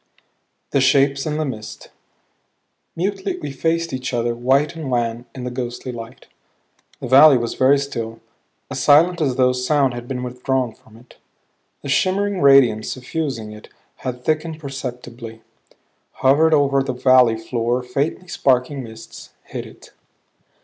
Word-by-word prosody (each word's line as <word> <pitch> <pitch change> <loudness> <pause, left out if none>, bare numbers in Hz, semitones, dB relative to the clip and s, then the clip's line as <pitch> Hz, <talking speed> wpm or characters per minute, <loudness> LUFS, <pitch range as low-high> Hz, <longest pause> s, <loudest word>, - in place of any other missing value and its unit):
THE 140 - +2
SHAPES 135 +2 +3
IN 150 0 -2
THE 155 - -1
MIST 110 -6 -8 1.0
Mutely 195 +3 -2
we 145 - -6
faced 165 +3 -1
each 130 -1 -3
other, 120 0 0
white 135 +6 +1
and 155 -4 -6
wan 120 -1 -1
in 130 - -7
the 125 - -4
ghostly 125 0 -5
light. 115 -1 -10 0.7
The - - -6
valley 140 +2 +7
was 120 -1 -3
very 135 +2 +4
still; 115 -5 -5 0.5
as - - -3
silent 165 +4 +4
as 135 -5 +1
though 125 -1 +3
sound 130 +1 +1
had 120 0 -7
been 125 -1 -4
withdrawn 125 -1 -2
from 110 0 -20
it. 120 +2 -19 0.7
The 140 - -6
shimmering 195 +5 +1
radiance 135 -6 +5
suffusing 130 -4 -4
it 105 0 -12 0.3
had 125 -1 -6
thickened 155 0 -1
perceptibly; 125 -5 -8 0.7
hovered 155 +4 +3
over 140 -2 +2
the 135 -1 -3
valley 125 -2 +4
floor 120 +2 -2
faintly 140 +8 -3
sparkling 135 -2 0
mists; 110 -1 -12
hid - - -7
it. - - -16
130 Hz, 145 wpm, -20 LUFS, 120-145 Hz, 1.0 s, valley